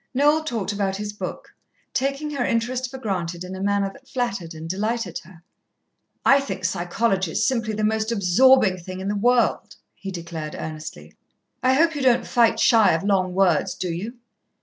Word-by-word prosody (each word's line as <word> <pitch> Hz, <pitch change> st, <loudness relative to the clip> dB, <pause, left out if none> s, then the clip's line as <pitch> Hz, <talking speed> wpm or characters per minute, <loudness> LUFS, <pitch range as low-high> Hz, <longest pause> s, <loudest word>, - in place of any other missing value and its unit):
Noel 295 Hz, +3 st, +3 dB
talked 225 Hz, -9 st, -3 dB
about 200 Hz, -1 st, -1 dB
his 205 Hz, +1 st, -5 dB
book, 210 Hz, -, -7 dB, 0.4 s
taking 275 Hz, +3 st, -1 dB
her 275 Hz, -4 st, -1 dB
interest 245 Hz, +2 st, -1 dB
for 265 Hz, -, -8 dB
granted 180 Hz, -7 st, -3 dB
in 185 Hz, +1 st, -7 dB
a 190 Hz, -, -7 dB
manner 200 Hz, -1 st, 0 dB
that 270 Hz, -, -18 dB
flattered 200 Hz, -11 st, -3 dB
and 160 Hz, +1 st, -7 dB
delighted 205 Hz, 0 st, -2 dB
her. 170 Hz, 0 st, -17 dB, 0.8 s
"I 275 Hz, -, +6 dB
think 265 Hz, -9 st, -5 dB
psychology 185 Hz, +1 st, 0 dB
is 215 Hz, -, +1 dB
simply 230 Hz, -4 st, -1 dB
the 215 Hz, -, -2 dB
most 220 Hz, +1 st, 0 dB
absorbing 215 Hz, +1 st, +4 dB
thing 185 Hz, +2 st, -8 dB
in 190 Hz, +1 st, -3 dB
the 205 Hz, -, -1 dB
world," 240 Hz, +4 st, +1 dB, 0.2 s
he 195 Hz, -, -8 dB
declared 165 Hz, -4 st, -6 dB
earnestly. 155 Hz, -, -8 dB, 0.5 s
"I 255 Hz, +1 st, +3 dB
hope 330 Hz, +3 st, +3 dB
you 290 Hz, -, -4 dB
don't 250 Hz, -2 st, +3 dB
fight 235 Hz, -2 st, +3 dB
shy 225 Hz, -6 st, +5 dB
of 160 Hz, -, -1 dB
long 185 Hz, -2 st, +1 dB
words, 185 Hz, -5 st, +2 dB
do 180 Hz, -2 st, -3 dB
you?" 210 Hz, +9 st, -5 dB
205 Hz, 180 wpm, -23 LUFS, 185-245 Hz, 0.8 s, I